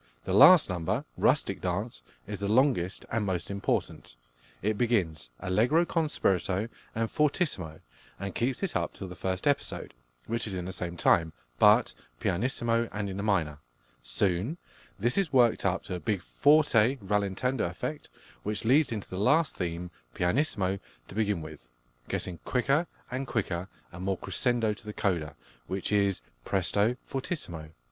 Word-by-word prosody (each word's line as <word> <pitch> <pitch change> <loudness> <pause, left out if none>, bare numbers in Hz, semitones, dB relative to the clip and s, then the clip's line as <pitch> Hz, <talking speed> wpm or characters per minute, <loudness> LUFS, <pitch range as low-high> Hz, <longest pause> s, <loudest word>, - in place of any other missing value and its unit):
The 95 - -2
last 170 - +9
number, 85 -3 -2
"Rustic - - +2
Dance," - - -3 0.2
is - - -5
the 100 - -2
longest 110 -5 +2
and 110 -1 0
most 95 -1 -2
important. 100 -10 -2 0.5
It 110 +1 +1
begins 90 - 0
allegro 125 - +2
con 165 -2 0
spirito 95 -1 0 0.3
and 115 0 0
fortissimo, 145 - 0 0.4
and 100 -1 -4
keeps 130 +9 -1
it 190 - -1
up - - -1
till 95 - -7
the 90 - -9
first 95 +2 -3
episode, 145 -1 -1 0.3
which 115 0 -1
is 100 - -3
in 90 -1 -4
the 95 - -5
same 85 -1 -4
time, 80 -2 +3 0.3
but - - +6 0.3
pianissimo 115 +3 0
and 100 -1 -3
in 95 - -5
the - - -2
minor. 85 -8 0 0.4
Soon 90 - 0 0.4
this 120 - +2
is 185 -7 0
worked 120 -6 +4
up 95 0 -1
to 95 - -6
a 90 - -3
big 100 -2 -1
forte 140 -4 +4
rallentando 105 +4 0
effect, - - -5 0.3
which 105 +2 -3
leads 135 +4 +4
into 105 -3 -4
the 95 - -5
last 145 +7 +3
theme, 85 0 -4 0.2
pianissimo 95 - +1 0.3
to - - -8
begin 105 -5 0
with, 80 -3 -9 0.5
getting 90 -3 -3
quicker 140 +6 +1 0.2
and 130 +2 -3
quicker 95 -6 -2 0.2
and 90 +1 -8
more 95 -1 0
crescendo 120 -1 0
to 105 - -13
the 105 - -6
coda, 80 -8 -1 0.3
which 95 +2 -3
is 100 -6 +2 0.2
presto 100 - +1
fortissimo. 90 - -4
100 Hz, 155 wpm, -29 LUFS, 90-125 Hz, 0.5 s, last